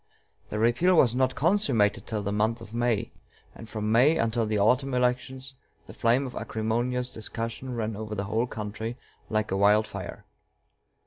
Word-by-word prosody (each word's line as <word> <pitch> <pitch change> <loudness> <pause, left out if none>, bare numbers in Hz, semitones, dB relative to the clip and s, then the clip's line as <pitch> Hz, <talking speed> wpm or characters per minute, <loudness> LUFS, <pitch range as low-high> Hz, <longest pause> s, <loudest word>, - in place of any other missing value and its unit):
The 105 - -3
repeal 120 +12 +3
was 125 -8 +5
not 130 0 +1
consummated 140 - +2
till 110 -3 -2
the 100 - -2
month 110 +3 +1
of 115 -1 -11
May; 120 -3 0 0.4
and 115 - -11
from 105 0 -2
May 135 +8 +5
until 115 0 0
the 105 0 0
autumn 125 +6 +2
elections 130 +2 -1 0.3
the - - -11
flame 120 +4 +2
of 125 - -6
acrimonious 120 +3 -2
discussion 115 +3 -5
ran 110 -2 -2
over 110 0 -5
the 100 - -2
whole 110 +4 0
country 110 +2 -5 0.3
like 110 -1 -1
a 95 - +1
wild 105 +2 +4
fire. 100 -4 -8
115 Hz, 170 wpm, -27 LUFS, 110-125 Hz, 0.4 s, was